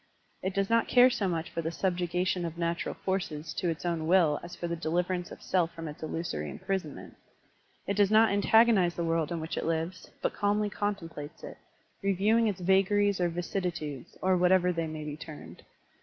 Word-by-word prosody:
It 190 0 -3
does 195 0 +1
not 230 +1 +2
care 250 0 +6
so 200 -5 0
much 165 -2 -2
for 165 - -2
the 165 - -2
subjugation 180 +1 -1
of 165 -1 -4
natural 170 0 -2
forces 160 -5 -3
to 175 - -1
its 165 +1 -4
own 165 -2 -1
will 165 -4 +4
as 175 - -9
for 175 - -4
the 170 - -2
deliverance 175 +2 -1
of - - -11
self 170 -3 0
from 165 -1 -6
its 150 - -9
illusory 155 - -3
imprisonment. 185 -6 -5 0.7
It 200 - -2
does 205 -2 +4
not 220 0 +5
antagonize 205 -3 +4
the 170 - -2
world 165 0 0
in 170 - -2
which 160 0 -5
it - - -1
lives, 165 +3 -2
but - - 0
calmly 205 0 0
contem 205 -5 -3
plates 145 0 -9
it, - - -8 0.4
reviewing 205 +4 +3
its 195 -3 -2
vagaries 195 +1 +3
or 175 - +2
vicissitudes, 170 -5 -4
or 185 0 +4
whatever 180 0 +4
they 165 -1 -2
may 155 -1 -6
be 150 -1 -4
termed. 150 - -10
175 Hz, 195 wpm, -29 LUFS, 165-195 Hz, 0.7 s, care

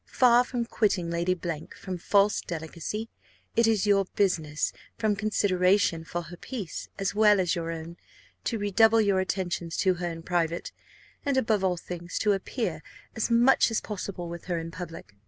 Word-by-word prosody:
Far 245 -1 +5
from 245 -1 -3
quitting 195 -7 0
Lady 175 +2 0 0.4
from 185 -2 -5
false 200 +3 +3
delicacy, 170 +6 -5 0.5
it 230 0 +4
is 215 -3 +2
your 200 -1 +4
business, 160 -6 +1 0.2
from 215 -2 +1
consideration 195 -4 +2
for 175 +1 -4
her 175 +1 -10
peace, 205 - -6
as 195 0 -1
well 210 -1 +5
as 180 -2 +2
your 165 -1 -3
own, 165 +1 -7 0.5
to 230 - 0
redouble 220 +2 +4
your 200 -3 +2
attentions 180 -3 -2
to 190 -2 +3
her 175 - -1
in 165 -1 -7
private, 170 -1 -1 0.5
and, 280 -2 0
above 220 -6 +2
all 180 -2 +1
things, 175 0 -6
to 210 -1 +3
appear 195 - -3 0.3
as 220 - -1
much 240 +3 +5
as 225 - 0
possible 190 -4 -5
with 170 0 -7
her 175 -2 -1
in 165 0 -5
public. 165 - -8
190 Hz, 170 wpm, -27 LUFS, 170-215 Hz, 0.5 s, Far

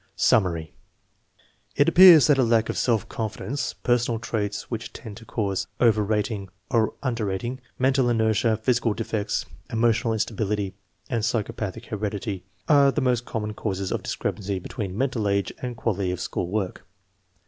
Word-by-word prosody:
Summary. 85 -7 +2 1.0
It 145 - +4
appears 170 -3 +9
that 145 -3 +4
lack 115 -3 +3
of - - -2
self 115 -4 +1
confidence, 110 +4 -3
personal 120 -2 0
traits 105 -3 -2
which 115 -1 -5
tend 110 -4 -9
to 115 - -12
cause 100 -5 -2
over 110 -3 +4
rating 105 -1 -1 0.2
or 115 -2 +2
un 130 -3 0
der 115 -2 -2
rating, 120 +7 -3 0.2
mental 130 -1 +2
inertia, 110 -1 +2
physical 115 -1 +1
defects, 110 -2 -2 0.3
emotional 115 0 +2
instability, 105 -2 -1 0.3
and 115 +1 -1
psychopathic 110 -1 -2
heredity 105 -2 -4 0.2
are 140 -2 +6
the 150 - -1
most 125 -3 +1
common 105 -1 -3
causes 100 -3 -3
of - - -1
discrepancy 100 -1 -3
between 95 0 -5
mental 125 -6 0
age 100 0 0
and 125 -2 -4
quality 100 -5 -1
of 90 0 -3
school 90 - -3
work. 95 -1 -3
110 Hz, 150 wpm, -25 LUFS, 100-120 Hz, 1.0 s, appears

